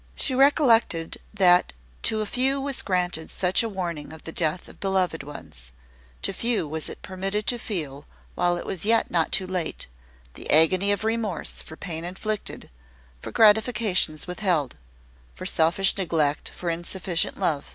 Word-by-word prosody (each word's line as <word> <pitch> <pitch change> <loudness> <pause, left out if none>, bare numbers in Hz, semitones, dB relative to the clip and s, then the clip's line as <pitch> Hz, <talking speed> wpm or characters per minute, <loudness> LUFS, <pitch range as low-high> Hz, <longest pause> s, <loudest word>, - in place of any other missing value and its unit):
She 265 - +2
reflected 250 - +3
that 180 - +4 0.3
to 215 -1 +1
few 265 +5 0
was 275 0 +1
granted 180 -4 -1
such 185 0 +2
a 230 - -2
warning 170 -7 -5
of 160 0 -12
the 160 - -6
death 160 +1 -1
of - - -14
beloved 190 -4 0
ones: 65 - -11 0.5
to 195 - 0
few 230 -4 -1
was 155 +1 -4
it - - -9
permitted 195 +3 -3
to 245 - +1
feel, 150 -10 -5 0.3
while 175 0 +1
it - - -6
was 185 - -2
yet 225 +2 +2
not 165 -2 +1
too 190 - +2
late, 180 -3 -3 0.5
the - - -10
agony 185 +6 +5
of 205 0 -1
remorse 220 -5 -1
for 160 - -11
pain 165 -4 -4
inflicted, 200 - -4 0.5
for - - -7
gratifications 215 - +3
withheld; 180 - -1 0.6
for - - -8
selfish 170 +4 +3
neglect, 160 -6 0
for 175 -2 -4
insufficient 175 +1 -2
love. 145 -4 -1
185 Hz, 155 wpm, -25 LUFS, 160-215 Hz, 0.6 s, agony